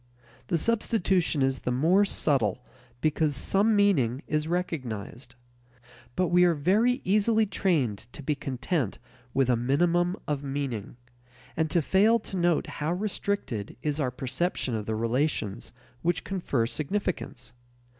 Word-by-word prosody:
The 170 - +1
substitution 190 - +1
is 135 -1 +1
the 125 - -2
more 170 +11 +4
subtle 125 - 0 0.4
because 155 -1 +1
some 205 +10 +2
meaning 150 - +2
is 155 0 -1
recognized. 125 - -4 0.8
But 180 -2 +1
we 180 0 +5
are 175 -2 +4
very 215 - +2
easily 215 +3 +3
trained 150 - 0
to 145 - -7
be 150 - +1
content 135 - -2 0.4
with 135 -2 +3
a 125 - +3
minimum 175 +9 +2
of 145 -2 -1
meaning, 135 -6 -4 0.6
and 160 0 0
to 170 -1 +2
fail 210 +8 +4
to 205 -3 -8
note 175 -3 +2
how 150 +3 -3
restricted 185 - -3
is 150 0 -1
our 135 -4 +1
perception 130 +2 -2
of 110 -2 -3
the 110 - -1
relations 115 -2 -1 0.3
which 170 -1 0
confer 170 -11 -1
significance. 175 - -3
155 Hz, 135 wpm, -27 LUFS, 125-185 Hz, 0.8 s, we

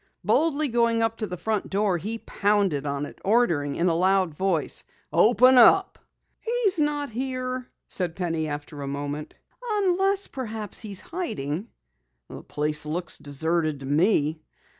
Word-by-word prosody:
Boldly 305 -2 +2
going 230 -1 +2 0.2
to 215 - -3
the 180 - -5
front 215 +4 -2
door 195 -3 +1
he 220 +6 -4
pounded 200 -10 0
on 140 0 -2
it, - - -12
ordering 170 -10 +2
in 175 - +1
a 170 - +3
loud 185 0 +2
voice: 170 -2 0 0.3
"Open 245 +7 +6
up!" 385 +11 +5 0.4
"He's 455 -6 +1
not 295 -2 0
here," 255 +1 -3 0.2
said 175 -3 -1
Penny 165 -4 -2
after 145 0 -6
a 140 - -4
moment. 145 +2 -5 0.3
"Unless 395 -3 +1
perhaps 220 -5 -5
he's 200 -4 -5
hiding." 195 - -4 0.6
"The - - -9
place 150 +1 -1
looks 170 +2 -2
deserted 155 +1 -1
to - - -7
me." 155 +1 +2
195 Hz, 140 wpm, -25 LUFS, 155-255 Hz, 0.6 s, Open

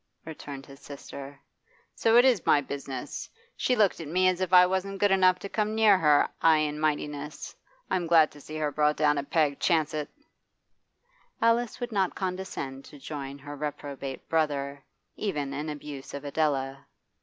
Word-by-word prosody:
returned 145 -3 -8
his 140 -1 -14
sister. 140 -1 -10 0.5
'So 225 +1 +3
it 245 - +7
is 245 -8 +3
my 145 - +4
business. 140 -1 -6 0.3
She 250 - +1
looked 210 -5 +2
at 160 - -7
me 185 +4 +2
as 185 0 +1
if 185 -1 -1
I 180 -1 +8
wasn't 190 +2 -2
good 205 0 +2
enough 185 -1 +5
to 190 - -7
come 215 +1 -1
near 220 -2 +6
her 150 -5 +4
'igh 160 -1 +6
and 150 +1 -5
mightiness. 150 -1 -3 0.3
I'm 175 -2 -1
glad 160 -2 +5
to 145 - -14
see 155 - -9
her 150 -1 -1
brought 150 +1 +2
down 150 -1 +3
a - - -3
peg, 145 -1 +1
chance 160 -3 +1
it!' 150 -1 -3 1.3
Alice 230 +1 +2
would 245 -1 -4
not 195 -4 0
condescend 180 -8 -4
to 145 - -13
join 140 -1 -6
her 145 +1 -9
reprobate 140 -2 -6
brother, 140 -3 -1 0.3
even 145 -9 -2
in 150 +2 -4
abuse 145 -2 -7
of 140 0 -7
Adela. 140 -2 -1
150 Hz, 175 wpm, -28 LUFS, 140-185 Hz, 1.3 s, I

